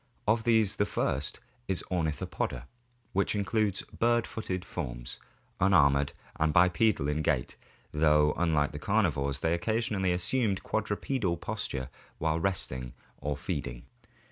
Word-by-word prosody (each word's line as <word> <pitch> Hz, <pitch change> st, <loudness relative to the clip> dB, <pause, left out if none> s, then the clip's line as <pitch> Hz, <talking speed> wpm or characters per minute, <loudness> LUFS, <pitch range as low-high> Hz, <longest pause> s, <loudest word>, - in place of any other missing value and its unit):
Of 110 Hz, +1 st, +2 dB
these 110 Hz, -3 st, +3 dB
the 100 Hz, -, +2 dB
first 70 Hz, -6 st, -1 dB, 0.3 s
is 95 Hz, -2 st, +1 dB
the 90 Hz, -, -4 dB
Ornithopoda, 75 Hz, -6 st, -2 dB, 0.5 s
which 100 Hz, +2 st, +1 dB
includes 105 Hz, -1 st, 0 dB
bird 120 Hz, 0 st, +1 dB
footed 95 Hz, -5 st, -4 dB
forms, -, -, -5 dB, 0.4 s
unarmored, 70 Hz, -7 st, +4 dB, 0.3 s
and 80 Hz, 0 st, +3 dB
bipedal 90 Hz, 0 st, +3 dB
in 75 Hz, +1 st, 0 dB
gait, 70 Hz, -5 st, 0 dB, 0.4 s
though 75 Hz, -1 st, +4 dB
unlike 80 Hz, -4 st, +2 dB
the 75 Hz, -, -6 dB
carnivores 75 Hz, -9 st, +1 dB
they 80 Hz, -, +2 dB
occasionally 105 Hz, 0 st, 0 dB
assumed 100 Hz, +3 st, +1 dB
the -, -, -11 dB
quadrupedal 105 Hz, -2 st, -1 dB
posture 75 Hz, -9 st, -4 dB, 0.3 s
while 80 Hz, 0 st, 0 dB
resting 65 Hz, -9 st, -1 dB, 0.3 s
or 75 Hz, -1 st, -2 dB
feeding. 70 Hz, -7 st, -4 dB
85 Hz, 130 wpm, -30 LUFS, 75-105 Hz, 0.5 s, unarmored